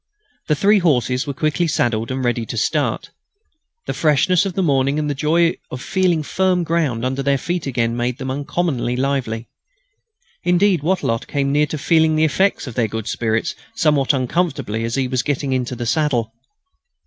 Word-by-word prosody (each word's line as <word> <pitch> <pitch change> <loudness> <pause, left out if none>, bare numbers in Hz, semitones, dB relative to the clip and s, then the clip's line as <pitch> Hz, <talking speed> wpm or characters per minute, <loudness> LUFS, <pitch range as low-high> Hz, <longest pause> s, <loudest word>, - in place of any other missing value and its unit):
The 150 - +2
three 205 +7 +4
horses 130 - +1
were 140 - -2
quickly 155 +4 0
saddled 115 -6 0
and 130 -1 -2
ready 120 -1 0
to 115 - -5
start. 110 - -1 0.7
The - - -3
freshness 165 +5 +2
of 190 - -4
the 190 - +1
morning 140 -2 +2
and 150 -1 -1
the 145 - 0
joy 165 +4 +2
of 125 - -6
feeling 180 +1 +1
firm 185 +2 +1
ground 155 -8 0
under 130 +2 -1
their 140 0 +2
feet 175 +2 -3
again 115 -3 0
made 120 +1 -1
them 130 -1 -4
uncommonly 140 -3 -1
lively. 125 -4 -2 1.0
Indeed, 180 -1 +3
Wattrelot 150 -9 -1
came 140 -1 -1
near 150 +1 +2
feeling 160 +1 +2
the 155 - +2
effects 190 +6 +1
of 125 - -7
their 115 0 +1
good 110 0 -5
spirits 115 +5 -1 0.2
somewhat 150 -5 +2
uncomfortably 135 - -1
as 115 - -2
he 135 -2 0
was 125 -1 0
getting 140 0 -1
into 125 -1 -2
the 120 0 -4
saddle. 120 -5 0
140 Hz, 175 wpm, -20 LUFS, 125-165 Hz, 1.0 s, three